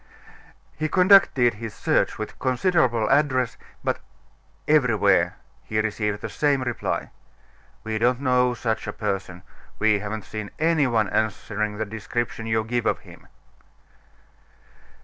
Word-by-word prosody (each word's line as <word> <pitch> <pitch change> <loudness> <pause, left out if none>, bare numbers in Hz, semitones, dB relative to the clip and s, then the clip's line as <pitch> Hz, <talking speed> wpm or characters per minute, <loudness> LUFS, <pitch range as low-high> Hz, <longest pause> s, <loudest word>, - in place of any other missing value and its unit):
He 155 0 -2
conducted 180 -10 +5
his 110 0 -7
search - - +1
with - - -7
considerable 130 - +1
address, 135 -4 +2 0.3
but - - -1 0.7
everywhere 105 - +3 0.3
he 110 - -2
received 105 -1 -1
the - - -3
same 140 -3 +1
reply. 120 -2 -3 0.7
"We 110 0 -2
don't 120 +2 +2
know 125 -2 +2
such 110 -1 -2
a - - -3
person; 95 -4 -4 0.3
we 110 -1 +3
haven't 105 +1 -5
seen 110 -2 -6
any 160 -3 +2
one 110 -4 +1
answering 105 -1 -1
the 110 - -2
description 110 +2 -4
you 110 0 +1
give 120 +1 -1
of - - 0
him." - - -16
115 Hz, 130 wpm, -24 LUFS, 105-130 Hz, 0.7 s, conducted